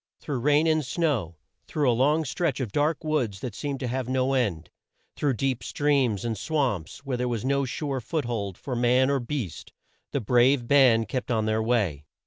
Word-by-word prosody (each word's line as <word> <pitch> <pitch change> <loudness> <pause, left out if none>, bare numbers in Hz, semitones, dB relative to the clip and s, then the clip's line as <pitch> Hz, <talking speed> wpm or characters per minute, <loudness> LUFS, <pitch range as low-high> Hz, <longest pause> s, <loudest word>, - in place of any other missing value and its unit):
Through 140 -4 -3
rain 150 +5 +3
and 155 -1 +2
snow, 130 - -1 0.3
through 150 -3 0
a 125 - +4
long 150 +6 +2
stretch 135 +1 -1
of 120 -6 -3
dark 150 +5 0
woods 130 -11 -1
that 125 -5 -4
seemed 140 +3 -4
to 130 - -2
have 125 0 -3
no 130 +1 +1
end, 100 -12 -1 0.4
through 140 -4 0
deep 130 0 -1
streams 135 -8 +1
and 115 -1 -1
swamps 130 - -2
where 130 -2 -2
there 125 0 -1
was 120 -1 -2
no 140 0 +1
sure 135 +1 -3
foot 155 +3 -2
hold 100 -6 -3
for 130 - -5
man 125 +3 +3
or 140 - +1
beast, 120 - -5 0.4
the 140 - 0
brave 125 +2 +3
band 125 -5 +5
kept 125 +3 -3
on 110 -3 +1
their 110 0 +1
way. 105 - 0
130 Hz, 195 wpm, -26 LUFS, 115-140 Hz, 0.4 s, band